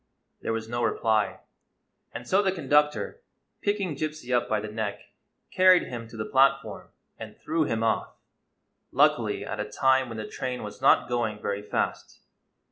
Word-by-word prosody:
There - - -2
was 115 0 -3
no 120 +1 -3
reply; 110 -3 +1 0.7
and - - -8
so 190 +2 +4
the 195 -2 +1
conductor, 150 - +1 0.4
picking 200 -6 -1
Gypsy 150 -4 -3
up 120 - 0
by 110 - +1
the 110 - -5
neck, 105 -1 -3 0.5
carried 185 -1 +6
him 115 -2 -7
to 115 - -12
the 110 - -3
platform 135 +4 +2 0.3
and - - -9
threw 160 -1 0
him 115 -4 -1
off 115 - 0 0.4
— - - -50
luckily - - +2
at - - -5
a - - -4
time 130 -1 +3
when 115 - -6
the 110 - -4
train 125 -1 -4
was 105 +4 -9
not 135 - +5
going 115 -3 -1
very 100 -1 -3
fast. 105 - -3
120 Hz, 170 wpm, -27 LUFS, 110-150 Hz, 0.7 s, carried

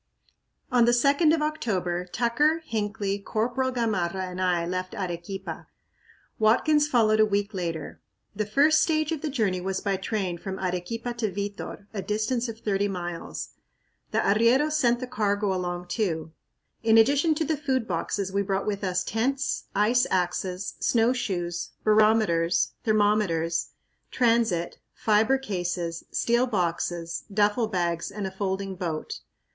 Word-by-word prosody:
On 245 -2 +5
the 240 - +4
2d 280 +6 +4
of 320 -1 +2
October, 185 - -1
Tucker, 290 - +1
Hinckley, 205 -3 -2
Corporal 240 +6 -1
Gamarra 195 -7 -1
and 185 +1 -5
I 175 -2 +1
left 185 +1 -3
Arequipa; 180 -1 -5 0.7
Watkins 295 +7 +4
followed 220 -6 +3
a 215 - +7
week 205 +1 -1
later. 165 -5 -4 0.3
The 210 0 -2
first 295 +8 +4
stage 310 -1 +1
of 320 -3 -2
the 310 - -2
journey 210 -9 0
was 190 +1 -2
by 200 -2 -1
train 190 -3 -2
from 190 +1 -5
Arequipa 190 +7 -3
to 215 -4 0
Vitor, 200 +1 -5
a 200 - -3
distance 220 +4 -1
of 225 - -6
thirty 200 -1 0
miles. 175 -3 -5 0.6
The - - -2
arrieros 235 +9 +3
sent 245 -5 +2
the - - -2
cargo 205 -4 0
along 180 -1 -3
too. 170 -6 -2 0.5
In 225 0 +4
addition 285 +7 +4
to 315 - -1
the 315 - 0
food 265 -5 -1
boxes 190 +2 -2
we 200 - +2
brought 195 0 -1
with 205 -1 -2
us 180 -1 0
tents, 265 +5 -1
ice 230 +5 +3
axes, 180 +1 -1
snowshoes, 195 -8 0
barometers, 215 -6 +3
thermometers, 205 -7 +1 0.4
transit, 230 -8 +1 0.2
fiber 220 +5 +3
cases, 175 -8 -3
steel 240 +2 +1
boxes, 175 -4 -2
duffle 210 +3 +2
bags, 170 -3 -1
and 200 0 -5
a 190 - -3
folding 190 0 -3
boat. 170 -4 -4
205 Hz, 140 wpm, -26 LUFS, 180-235 Hz, 0.7 s, a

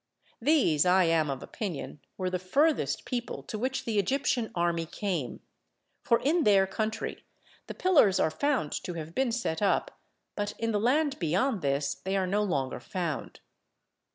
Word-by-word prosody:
These, 235 - +3
I 185 +1 +4
am 165 -3 +2
of 135 -1 -4
opinion, 175 -7 -5 0.2
were 185 -1 -2
the 180 - -1
furthest 185 - +1
people 245 -1 -4
to 215 - -6
which 260 +3 -2
the 220 -3 +1
Egyptian 240 +2 0
army 170 -1 0
came, 175 - -3 0.6
for 235 - +3
in 320 +5 +2
their 195 -4 +5
country 215 +3 -3 0.4
the - - -7
pillars 295 - +4
are 160 - +2
found 260 - 0
to 175 - -4
have 160 0 -6
been 265 +1 +1
set 225 -8 -2
up, 200 - 0 0.4
but 205 0 -3
in 230 0 -1
the 210 - +1
land 280 +5 +1
beyond 190 - +1
this 140 0 0
they 190 +7 -3
are 190 - +1
no 200 +3 +1
longer 140 -10 -1
found. 170 -6 -4
195 Hz, 165 wpm, -29 LUFS, 165-240 Hz, 0.6 s, their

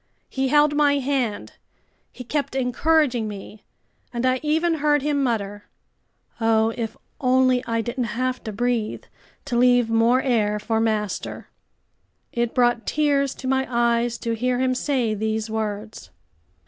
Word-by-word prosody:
He 265 0 -1
held 295 +2 +4
my 290 -1 +3
hand, 260 -6 -2 0.6
he 250 - -9
kept 280 +2 -2
encouraging 260 -1 +1
me, 210 +1 -9 0.5
and 240 +1 -2
I 255 0 +2
even 320 +2 +1
heard 295 -1 +2
him 290 -1 +1
mutter: 205 -5 -2 0.7
"Oh, 225 -1 +3
if 225 -2 -4 0.2
only 255 -1 +3
I 230 0 0
didn't 240 +2 -3
have 255 +1 -2
to 220 - -3
breathe, 235 0 -1 0.4
to 265 -4 -3
leave 245 -1 +4
more 230 +3 +4
air 215 -5 +1
for 220 +1 -1
master!" 215 -3 -2 0.8
It 235 -1 -1
brought 240 -2 +2
tears 280 -2 +1
to 260 - -7
my 265 0 +1
eyes 235 -1 +1
to 230 -1 -3
hear 250 +2 0
him 255 0 +1
say 250 -4 0
these 220 +1 -2
words. 215 - -4
245 Hz, 145 wpm, -23 LUFS, 225-265 Hz, 0.8 s, held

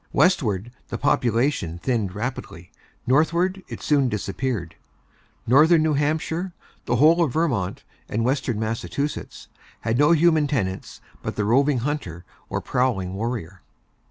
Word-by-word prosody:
Westward, 120 - +2 0.2
the - - -3
population 115 - +1
thinned 105 -2 -1
rapidly; 105 -6 -6 0.3
northward, 170 +8 +2
it - - -8
soon 140 -4 +3
disappeared. 105 -3 -3 0.7
Northern 155 +6 +5
New 155 -1 +2
Hampshire, 160 +5 -1 0.3
the 120 - +1
whole 160 +7 +5
of 140 -7 -1
Vermont, 120 - -1 0.3
and 115 +2 -1
Western 130 -4 0
Massachusetts 115 +6 -4 0.3
had 115 +3 0
no 145 +2 +5
human 160 -2 +4
tenants 95 -10 -3 0.2
but - - -4
the 105 - -1
roving 135 +5 +3
hunter 115 - -4 0.2
or - - -2
prowling 110 -8 0
warrior. 100 -5 -4
125 Hz, 130 wpm, -23 LUFS, 105-150 Hz, 0.7 s, Northern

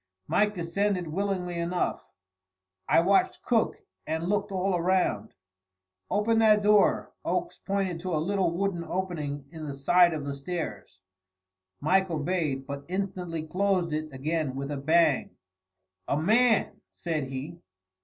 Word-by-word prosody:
Mike 210 0 +2
descended 180 +2 -1
willingly 180 -1 -2
enough. 175 +1 -1 0.9
I - - +6
watched 195 +3 +2
Cook 230 -3 +2 0.3
and 160 +2 -2
looked 205 +1 0
all 190 0 0
around. 175 - 0 0.7
"Open 225 +2 +2
that 215 -2 +5
door." 210 -1 +3
Oakes 345 - -2
pointed 195 -3 -2
to 180 -1 -2
a - - +1
little 185 +3 +1
wooden 175 0 -1
opening 160 -6 -3
in 160 -2 -8
the 140 - -5
side 170 +5 +4
of 145 -2 -4
the 140 - -3
stairs. 140 - -5 0.8
Mike 190 +5 +3
obeyed, 150 -4 -1
but 140 +1 -6
instantly 180 -3 -3
closed 185 -1 0
it 155 0 -3
again 145 +1 -2
with 140 +1 -4
a 145 - -2
bang. 155 0 +2 0.7
"A 140 - +1
man!" 225 +6 +3
said 160 -4 -3
he. 140 +6 -6
175 Hz, 135 wpm, -28 LUFS, 155-195 Hz, 0.9 s, I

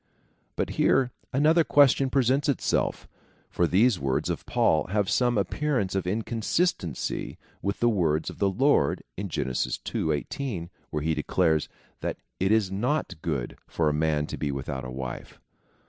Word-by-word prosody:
But - - -1
here 130 -2 +3 0.2
another 155 +5 +4
question 140 -2 +4
presents 135 +2 +2
itself, 140 - 0 0.4
for 85 - +2
these 105 +3 +3
words 65 -1 0
of - - -5
Paul 75 - +2
have 100 +1 0
some 120 -2 +2
appearance 105 0 0
of 95 -2 -1
inconsistency 110 - -1 0.2
with 100 - -2
the 120 - +4
words 80 -8 +1
of - - -14
the 100 - +3
Lord, 120 - +2
in 100 +1 -4
Gen. 75 - -2
ii. 60 - -2
1 75 -2 0
8, 105 -12 -4 0.2
where 75 -1 -3
he 80 +1 +1
declares, 80 +1 +1 0.3
that - - -3 0.2
it 95 +2 +2
is 110 -4 +3
not 105 - -1
good 70 -7 -3
for 80 -2 +1
a - - 0
man 75 -1 +1
to - - -6
be 75 - -2
without 65 -1 -4
a 65 - -6
wife. 65 0 -7
95 Hz, 160 wpm, -27 LUFS, 75-125 Hz, 0.4 s, another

